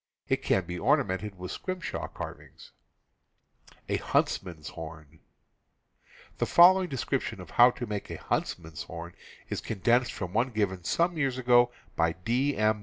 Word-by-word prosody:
It -, -, +1 dB
can 95 Hz, -, +1 dB
be 90 Hz, 0 st, -5 dB
ornamented 95 Hz, +1 st, +1 dB
with 90 Hz, 0 st, -6 dB
scrimshaw 185 Hz, -1 st, -4 dB
carvings. -, -, -9 dB, 1.1 s
The -, -, -1 dB, 2.5 s
following 185 Hz, +1 st, +7 dB
description 135 Hz, -3 st, -2 dB
of -, -, -10 dB
how 120 Hz, +1 st, +7 dB
to 120 Hz, 0 st, -5 dB
make 105 Hz, -2 st, -5 dB
a -, -, -5 dB
hunts -, -, -1 dB
man's 80 Hz, -3 st, -9 dB
horn 85 Hz, +1 st, -8 dB, 0.4 s
is -, -, -3 dB
condensed 120 Hz, +4 st, +1 dB
from 95 Hz, -4 st, -5 dB
one 120 Hz, +4 st, +2 dB
given 100 Hz, -6 st, -1 dB
some 170 Hz, -, +1 dB
years 135 Hz, -3 st, 0 dB
ago 120 Hz, -1 st, +4 dB, 0.2 s
by 80 Hz, 0 st, +2 dB
D. 125 Hz, +11 st, 0 dB
M. 110 Hz, 0 st, +2 dB
110 Hz, 135 wpm, -29 LUFS, 90-130 Hz, 2.5 s, following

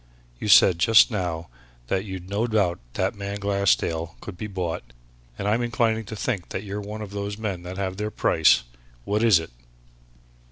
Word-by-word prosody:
"You -, -, -4 dB
said 95 Hz, -3 st, +7 dB
just 115 Hz, +7 st, +6 dB
now 85 Hz, -5 st, -3 dB, 0.4 s
that 95 Hz, +9 st, -1 dB
you'd 95 Hz, -2 st, -7 dB
no 105 Hz, +4 st, -1 dB
doubt 100 Hz, -6 st, +1 dB
that -, -, 0 dB
man 100 Hz, 0 st, -5 dB
Glassdale 100 Hz, -5 st, 0 dB
could 105 Hz, -, -8 dB
be 105 Hz, -, -5 dB
bought, 90 Hz, -4 st, -3 dB, 0.6 s
and 100 Hz, -, -3 dB
I'm 110 Hz, +3 st, +2 dB
inclining 115 Hz, -2 st, 0 dB
to 110 Hz, -, -7 dB
think 105 Hz, -5 st, -3 dB
that 95 Hz, -, -4 dB
you're 100 Hz, 0 st, -5 dB
one 105 Hz, +1 st, -6 dB
of 100 Hz, -, -9 dB
those 100 Hz, 0 st, -4 dB
men 100 Hz, -5 st, -3 dB
that 90 Hz, +1 st, -7 dB
have 95 Hz, -1 st, -3 dB
their 105 Hz, +1 st, -2 dB
price. 85 Hz, -, +3 dB, 0.4 s
What 105 Hz, -, 0 dB
is 110 Hz, -6 st, +6 dB
it?" 80 Hz, -4 st, -5 dB
100 Hz, 185 wpm, -24 LUFS, 90-105 Hz, 0.6 s, said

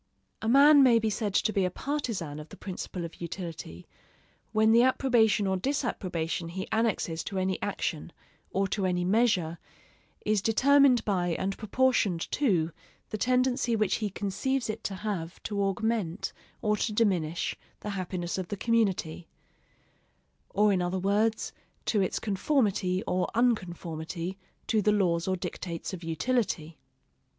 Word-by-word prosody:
A 220 Hz, -, -1 dB
man 285 Hz, +3 st, +8 dB
may 250 Hz, -3 st, +6 dB
be 220 Hz, -1 st, +1 dB
said 205 Hz, -1 st, -2 dB
to 215 Hz, -, +2 dB
be 195 Hz, -, +2 dB
a 180 Hz, -, +1 dB
partisan 200 Hz, -, -3 dB
of 150 Hz, +1 st, -10 dB
the -, -, -12 dB
principle 180 Hz, -2 st, -5 dB
of 165 Hz, -, -11 dB
utility, 165 Hz, -, -6 dB, 0.7 s
when 220 Hz, 0 st, +4 dB
the 230 Hz, +1 st, +6 dB
approbation 240 Hz, -5 st, +3 dB
or 190 Hz, -1 st, +1 dB
disapprobation 185 Hz, -, -2 dB
he 190 Hz, +3 st, -5 dB
annexes 215 Hz, -7 st, 0 dB
to 195 Hz, -, -4 dB
any 190 Hz, 0 st, -1 dB
action, 165 Hz, -5 st, -3 dB, 0.4 s
or 195 Hz, 0 st, 0 dB
to 195 Hz, -1 st, 0 dB
any 180 Hz, -1 st, 0 dB
measure, 185 Hz, -5 st, +2 dB, 0.7 s
is 210 Hz, -2 st, +2 dB
determined 265 Hz, +2 st, +4 dB
by 180 Hz, -4 st, +1 dB
and 195 Hz, +1 st, -2 dB
proportioned 215 Hz, -6 st, +1 dB
to 180 Hz, -, +1 dB, 0.4 s
the 215 Hz, -, -2 dB
tendency 250 Hz, -1 st, +2 dB
which 215 Hz, -3 st, +1 dB
he 215 Hz, -2 st, -2 dB
conceives 215 Hz, +6 st, -1 dB
it -, -, -9 dB
to 195 Hz, -, -2 dB
have 185 Hz, -5 st, -4 dB
to 205 Hz, -2 st, -2 dB
augment 200 Hz, -2 st, -1 dB, 0.3 s
or 210 Hz, -1 st, +2 dB
to 220 Hz, -, -1 dB
diminish 180 Hz, -7 st, 0 dB, 0.3 s
the 210 Hz, -, -4 dB
happiness 185 Hz, -2 st, -3 dB
of 185 Hz, -, -4 dB
the 205 Hz, -, -4 dB
community; 190 Hz, -8 st, 0 dB, 1.2 s
or 210 Hz, 0 st, +3 dB
in 185 Hz, -, +1 dB
other 180 Hz, +1 st, -1 dB
words, 210 Hz, +4 st, +1 dB, 0.3 s
to 210 Hz, -, +2 dB
its 190 Hz, -, 0 dB
conformity 200 Hz, -4 st, +1 dB
or 180 Hz, 0 st, 0 dB
unconformity 175 Hz, -5 st, -1 dB, 0.3 s
to 220 Hz, -2 st, +2 dB
the 210 Hz, -, +3 dB
laws 175 Hz, -5 st, +1 dB
or 190 Hz, -, +1 dB
dictates 175 Hz, -1 st, -5 dB
of 180 Hz, -2 st, -6 dB
utility. 165 Hz, -, -1 dB
195 Hz, 150 wpm, -28 LUFS, 175-225 Hz, 1.2 s, man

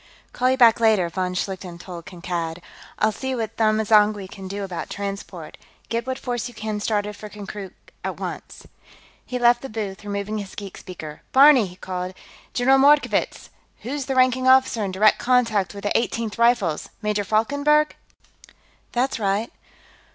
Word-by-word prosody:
"Call 255 Hz, +1 st, +2 dB
you 260 Hz, -, +2 dB
back, 235 Hz, -3 st, +6 dB
later," 215 Hz, -6 st, +3 dB
von 180 Hz, +1 st, -2 dB
Schlichten 185 Hz, -2 st, -4 dB
told 175 Hz, -1 st, -9 dB
Kankad. 170 Hz, -2 st, -4 dB, 0.4 s
"I'll 215 Hz, -, +2 dB
see 265 Hz, +4 st, -4 dB
what 225 Hz, -2 st, -4 dB
Them 215 Hz, -1 st, +3 dB
M'zangwe 210 Hz, -2 st, +3 dB
can 195 Hz, -1 st, -8 dB
do 200 Hz, +1 st, -4 dB
about 185 Hz, -3 st, -5 dB
transport; 200 Hz, 0 st, -6 dB, 0.3 s
get 235 Hz, +1 st, -2 dB
what 260 Hz, 0 st, -2 dB
force 245 Hz, -2 st, -3 dB
you 245 Hz, -, -12 dB
can 215 Hz, -1 st, -3 dB
started 210 Hz, -1 st, -1 dB
for 210 Hz, -, -9 dB
Konkrook 205 Hz, -2 st, -8 dB, 0.3 s
at -, -, -4 dB
once." -, -, -7 dB, 0.6 s
He 250 Hz, -, -4 dB
left 240 Hz, 0 st, +4 dB
the 270 Hz, -, -7 dB
booth, 210 Hz, -3 st, -5 dB
removing 205 Hz, +1 st, -3 dB
his 200 Hz, -2 st, -8 dB
geek 200 Hz, -2 st, -7 dB
speaker. 155 Hz, -4 st, -9 dB
"Barney!" 270 Hz, -5 st, +7 dB
he 180 Hz, -, -12 dB
called. 185 Hz, 0 st, -5 dB, 0.4 s
"General 265 Hz, +2 st, +4 dB
Mordkovitz! 290 Hz, +2 st, +3 dB, 0.3 s
Who's 270 Hz, +2 st, -4 dB
the 270 Hz, -, -1 dB
ranking 255 Hz, 0 st, +3 dB
officer 260 Hz, -4 st, +4 dB
in 195 Hz, -, -2 dB
direct 210 Hz, +3 st, +4 dB
contact 230 Hz, -6 st, +1 dB
with 200 Hz, -, -8 dB
the 205 Hz, -, -1 dB
Eighteenth 230 Hz, -2 st, -1 dB
Rifles? 235 Hz, -9 st, +2 dB
Major 210 Hz, -1 st, 0 dB
Falkenberg?" 285 Hz, +9 st, +2 dB, 1.0 s
"That's 250 Hz, 0 st, 0 dB
right." 205 Hz, +2 st, -1 dB
215 Hz, 165 wpm, -23 LUFS, 195-245 Hz, 1.0 s, Barney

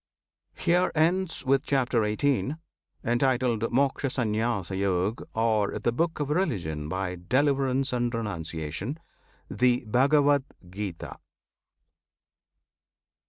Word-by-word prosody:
HERE 180 Hz, +1 st, +2 dB
ENDS, 170 Hz, +1 st, +1 dB
WITH 135 Hz, +1 st, +3 dB
CHAPTER 130 Hz, -6 st, +1 dB
XVIII., 135 Hz, +6 st, 0 dB, 0.5 s
Entitled 120 Hz, -1 st, +1 dB
"Mokshasanyasayog," 110 Hz, -6 st, 0 dB
Or 110 Hz, -2 st, +1 dB
"The 120 Hz, -, 0 dB
Book 165 Hz, +7 st, -1 dB
of 145 Hz, -1 st, -2 dB
Religion 90 Hz, -, -1 dB
by 95 Hz, 0 st, -2 dB
Deliverance 135 Hz, -1 st, +2 dB
and 120 Hz, -1 st, 0 dB
Renunciation," 90 Hz, -, -4 dB, 0.5 s
THE 125 Hz, 0 st, +1 dB
BHAGAVAD 140 Hz, +4 st, +4 dB, 0.3 s
GITA. 95 Hz, -3 st, -6 dB
120 Hz, 85 wpm, -27 LUFS, 105-140 Hz, 0.5 s, BHAGAVAD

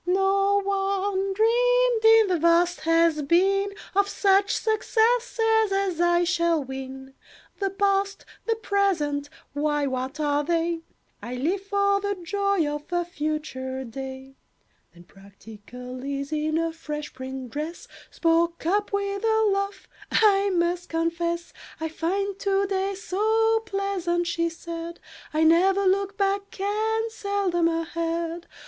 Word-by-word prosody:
"No 390 Hz, +2 st, +2 dB
one 390 Hz, 0 st, 0 dB
dreamed, 485 Hz, +2 st, +3 dB
in 445 Hz, 0 st, +7 dB
the 360 Hz, -2 st, +1 dB
vast 340 Hz, +2 st, +3 dB
Has 330 Hz, -1 st, +3 dB
Been, 385 Hz, +7 st, +2 dB, 0.3 s
Of 400 Hz, 0 st, +3 dB
such 400 Hz, 0 st, +3 dB
successes 445 Hz, 0 st, +2 dB
as 390 Hz, -3 st, 0 dB
I 345 Hz, 0 st, +3 dB
shall 340 Hz, -3 st, +1 dB
win. 265 Hz, 0 st, -8 dB, 0.5 s
"The 395 Hz, -1 st, 0 dB
past, 395 Hz, 0 st, 0 dB, 0.2 s
the 455 Hz, -, +2 dB
present—why, 295 Hz, -, -1 dB
what 260 Hz, +2 st, -3 dB
are 290 Hz, -1 st, +1 dB
they? 335 Hz, +1 st, 0 dB, 0.4 s
I 245 Hz, +2 st, -5 dB
live 335 Hz, +10 st, -1 dB
for 400 Hz, 0 st, +1 dB
the 405 Hz, 0 st, -1 dB
joy 395 Hz, 0 st, 0 dB
of 295 Hz, +3 st, -5 dB
a 350 Hz, 0 st, 0 dB
future 295 Hz, -5 st, -4 dB
day." 265 Hz, +2 st, -8 dB, 0.5 s
Then 175 Hz, 0 st, -16 dB
practical 220 Hz, +6 st, -11 dB
Is, 280 Hz, +1 st, -4 dB
in 310 Hz, +1 st, 0 dB
a 330 Hz, 0 st, -1 dB
fresh 300 Hz, -2 st, -6 dB
print 260 Hz, -1 st, -7 dB
dress, 310 Hz, +5 st, -5 dB, 0.2 s
Spoke 335 Hz, 0 st, +1 dB
up 410 Hz, +4 st, +1 dB
with 400 Hz, 0 st, -2 dB
a 440 Hz, -1 st, +3 dB
laugh, 395 Hz, -1 st, -3 dB, 0.2 s
"I 405 Hz, -2 st, +4 dB
must 350 Hz, -1 st, 0 dB
confess 335 Hz, +1 st, -2 dB, 0.3 s
"I 320 Hz, 0 st, -2 dB
find 390 Hz, +5 st, -2 dB
to 395 Hz, 0 st, +1 dB
day 390 Hz, 0 st, -1 dB
so 440 Hz, +4 st, +1 dB
pleasant," 390 Hz, -4 st, -1 dB
she 335 Hz, 0 st, 0 dB
said, 335 Hz, 0 st, -7 dB, 0.3 s
"I 310 Hz, +1 st, +1 dB
never 375 Hz, +5 st, +4 dB
look 395 Hz, +1 st, +1 dB
back, 395 Hz, 0 st, -1 dB
and 440 Hz, +3 st, 0 dB
seldom 400 Hz, -5 st, 0 dB
ahead. 335 Hz, 0 st, -2 dB
350 Hz, 130 wpm, -25 LUFS, 310-400 Hz, 0.5 s, in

